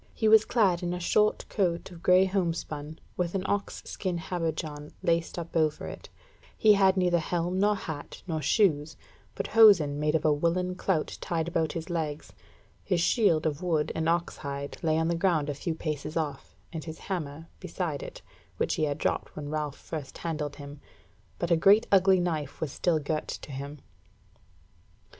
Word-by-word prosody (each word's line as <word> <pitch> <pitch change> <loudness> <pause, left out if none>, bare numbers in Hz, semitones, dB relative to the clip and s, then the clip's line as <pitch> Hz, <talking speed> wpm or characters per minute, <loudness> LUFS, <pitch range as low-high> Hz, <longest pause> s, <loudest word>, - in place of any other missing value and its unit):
He 220 - +1
was 220 0 +7
clad 195 -7 +2
in 175 0 -2
a - - -4
short 210 +4 +2
coat 180 -3 -1
of 170 -2 -12
grey 185 0 +5
homespun, 165 -5 -2 0.2
with 175 0 -1
an 190 - 0
ox 200 0 -2
skin 185 -3 -3
habergeon 160 -4 -4
laced 170 0 0
up 170 -1 -6
over 155 -2 +1
it; - - -8 0.5
he 215 -1 +6
had 195 -1 +4
neither 180 -2 +3
helm 175 +3 -1
nor 205 +1 +3
hat, 160 -6 -7
nor 160 -4 -2
shoes, 155 - +2 0.4
but - - -3
hosen 180 -11 +6
made 150 +1 +1
of 160 - 0
a 155 - +5
woollen 170 +4 0
clout 180 -3 -1
tied 165 -1 -1
about 165 -2 0
his 165 +1 -5
legs; 155 -3 -3 0.5
his 180 -3 0
shield 170 -4 +3
of 155 0 -1
wood 160 -4 0
and 160 0 0
ox 170 0 0
hide 140 -1 -5
lay 160 -1 +2
on 160 0 +1
the 170 - +1
ground 165 -4 +1
a - - -3
few 160 +4 -3
paces 155 0 -4
off, 145 -4 -4 0.2
and 160 -2 -5
his 160 -1 -7
hammer 160 -4 -5
beside 170 -5 -3
it, - - -9 0.3
which - - 0
he 155 - +1
had 145 -1 -2
dropped - - -2
when 145 -1 -6
Ralph 150 -2 -3
first 145 -5 -7
handled 150 -4 -3
him, 145 0 -10 0.6
but 170 - -2
a - - +7
great 200 +6 +5
ugly 190 -1 +5
knife 160 -5 -2
was 155 -4 -3
still 170 +1 +1
girt 155 +1 -2
to - - -7
him. 140 +2 -6
165 Hz, 185 wpm, -28 LUFS, 150-180 Hz, 0.6 s, was